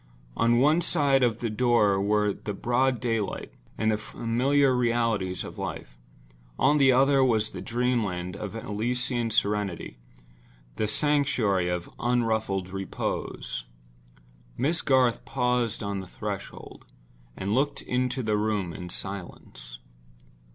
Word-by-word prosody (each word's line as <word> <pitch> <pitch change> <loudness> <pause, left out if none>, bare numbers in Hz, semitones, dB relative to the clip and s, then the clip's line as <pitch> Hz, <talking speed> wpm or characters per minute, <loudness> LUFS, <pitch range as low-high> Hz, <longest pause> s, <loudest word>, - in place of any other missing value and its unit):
On 115 +1 +3
one 150 +7 +4
side 145 -5 +3
of 120 -2 +1
the 115 - -1
door 105 -4 +3
were 105 0 +2
the 105 +1 -6
broad 125 +3 +1
daylight 115 -4 -2 0.2
and 110 0 +2
the 105 - 0
familiar 130 +5 +1
realities 115 -6 0
of - - -9
life. - - -6 0.6
On 145 +2 +3
the 135 -1 +6
other 135 +1 +4
was 110 -4 +2
the 90 - -7
dream 120 +3 0
land 90 -1 -4
of 105 +1 -6
Elysian 120 +2 -2
serenity—the - - -4
sanctuary 110 -8 +2
of 90 -1 -2
unruffled 110 -6 0
repose. 95 -9 -4 0.9
Miss 160 +6 +1
Garth 130 -4 +2
paused 125 -4 0
on 100 -1 -2
the 95 - -8
threshold, - - -7 0.5
and 100 +2 -2
looked 140 +4 0
into 125 +1 -1
the 110 -1 +1
room 105 -5 -1
in 90 +1 -7
silence. 90 -11 -7
110 Hz, 125 wpm, -27 LUFS, 100-125 Hz, 0.9 s, the